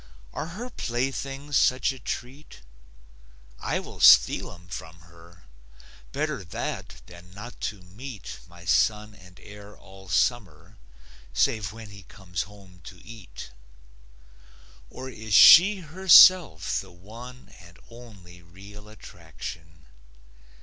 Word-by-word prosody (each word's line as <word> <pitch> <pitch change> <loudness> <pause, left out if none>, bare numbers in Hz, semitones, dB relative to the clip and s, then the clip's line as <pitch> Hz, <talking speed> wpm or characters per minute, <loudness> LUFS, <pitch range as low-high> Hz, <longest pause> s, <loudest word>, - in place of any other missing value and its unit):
Are - - -5
her 245 +2 -7
playthings 135 - -3
such 130 0 +2
a 135 - -11
treat? 130 - -8 1.0
I - - -2
will - - -11
steal - - +5
'em 85 0 -16
from 80 0 -10
her; 85 0 -19 0.7
Better - - -3
that 85 - -7
than 85 +1 -15
not 120 +4 -11
to 100 -3 -14
meet 105 +4 -10
My 85 0 -16
son 105 +4 0
and 90 -3 -18
heir 105 0 -14
all 95 0 -16
summer, 95 -2 -2 0.5
Save 105 - 0
when 110 -2 -12
he 100 0 -13
comes 90 -1 -7
home 95 -4 -18
to 90 - -12
eat. 105 - -12 1.4
Or 130 +1 -9
is 110 -5 -4
she 195 +3 +8
herself 175 - +5
the 95 - -15
one 115 +8 -13
And 85 0 -17
only 100 -7 -15
real 100 +5 -15
attraction? 80 -5 -12
100 Hz, 120 wpm, -25 LUFS, 85-120 Hz, 1.4 s, she